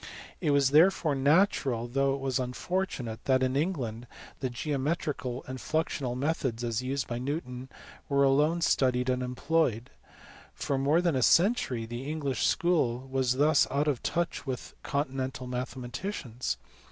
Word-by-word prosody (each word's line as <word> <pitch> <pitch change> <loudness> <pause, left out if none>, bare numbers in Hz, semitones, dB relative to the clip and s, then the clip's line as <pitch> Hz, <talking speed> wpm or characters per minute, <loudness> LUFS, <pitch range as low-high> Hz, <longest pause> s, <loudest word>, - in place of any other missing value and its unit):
It 160 - 0
was 140 -2 +4
therefore 160 0 +5
natural 140 - +2
though 135 +2 +1
it 140 - -7
was 135 -2 0
unfortunate 125 -3 -3
that 130 -1 +3
in 130 0 0
England 130 -8 -2 0.3
the 130 - -1
geometrical 140 -1 -2
and 130 0 -6
fluxional 140 -6 -1
methods 130 -5 -1
as 115 0 -1
used 135 +1 -2
by 120 0 -4
Newton 130 -2 -4 0.4
were 140 -1 +3
alone 150 +5 +3
studied 130 -5 +2
and 125 0 -1
employed. 125 -1 0 0.6
For 140 -1 -1
more 145 +5 +3
than 170 -5 +2
a 130 - +1
century 165 - +3
the 120 +5 -6
English 140 -6 0
school 135 -8 +1
was 130 -2 +2
thus 150 +1 +4
out 145 +3 0
of 140 -5 0
touch 170 0 -1
with 130 -2 -5
continental 135 -2 -2
mathematicians. 125 - -4
135 Hz, 145 wpm, -29 LUFS, 125-150 Hz, 0.6 s, therefore